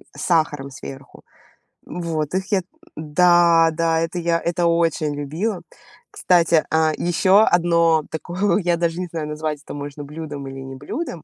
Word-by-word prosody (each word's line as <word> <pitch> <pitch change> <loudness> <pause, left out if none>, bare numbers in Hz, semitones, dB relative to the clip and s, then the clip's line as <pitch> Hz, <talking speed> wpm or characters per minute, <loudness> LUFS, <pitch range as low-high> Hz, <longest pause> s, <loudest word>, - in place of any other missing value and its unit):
сахаром 150 -5 0
сверху. 135 0 -11 0.6
Вот, 165 -2 -4
их 190 +3 -2
я 200 - +4
м - - -8 0.3
Да, 165 +1 +4
да, 165 0 +1
это 165 +2 -3
я 170 0 +1
это 170 0 -1
очень 165 -3 +1
любила. 170 +8 -3 0.5
Кстати, 170 -3 +2
а, 160 -1 +2
еще 185 +4 +4
одно 170 -3 +3
такое, 180 +6 -1
я 175 -1 +1
даже 170 0 -1
не 180 - -4
знаю, 160 -2 -5
назвать 150 -1 -4
это - - -10
можно 145 0 -7
блюдом 145 -2 -7
или 135 0 -8
не 135 0 -8
блюдом, 165 - -6
165 Hz, 155 wpm, -21 LUFS, 150-175 Hz, 0.6 s, я